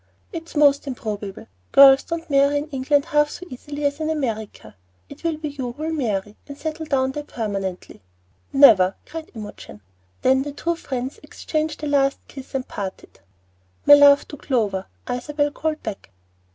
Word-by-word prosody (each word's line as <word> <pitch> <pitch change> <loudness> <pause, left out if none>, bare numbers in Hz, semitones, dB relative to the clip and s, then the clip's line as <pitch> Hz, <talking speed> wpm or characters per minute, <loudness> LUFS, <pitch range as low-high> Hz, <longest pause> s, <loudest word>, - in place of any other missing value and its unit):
"It's 330 -1 -8
most 285 -1 +4
improbable. 210 -6 -5 0.3
Girls 275 0 +8
don't 335 0 -5
marry 280 0 +3
in 295 +2 -4
England 280 +1 +1
half 295 -3 +2
so 360 - -8
easily 290 +3 -6
as 285 +1 0
in 315 0 -2
America. 220 - -4 0.3
It - - -13
will 330 -2 -1
be 305 -1 -4
you 260 -4 -5
who 295 +5 -8
will 320 +1 -2
marry, 210 -8 -2
and 285 -1 -9
settle 315 +1 -5
over 265 -1 +2
there 295 - -4
permanently." 195 - -5 0.5
"Never!" 215 -10 +6
cried 320 0 -8
Imogen. 205 - -10 0.4
Then 265 +1 +4
the 285 +1 -5
two 335 +4 -2
friends 260 - -5
exchanged 310 -1 -4
a - - -1
last 275 -1 +2
kiss 270 -1 -10
and 260 -1 -2
parted. 195 -2 -7 0.7
"My 290 - +9
love 285 0 +7
to 295 - -8
Clover," 210 -9 -1 0.2
Isabel 290 +4 -1
called 310 +1 -3
back. 210 - -6
280 Hz, 165 wpm, -22 LUFS, 240-300 Hz, 0.7 s, My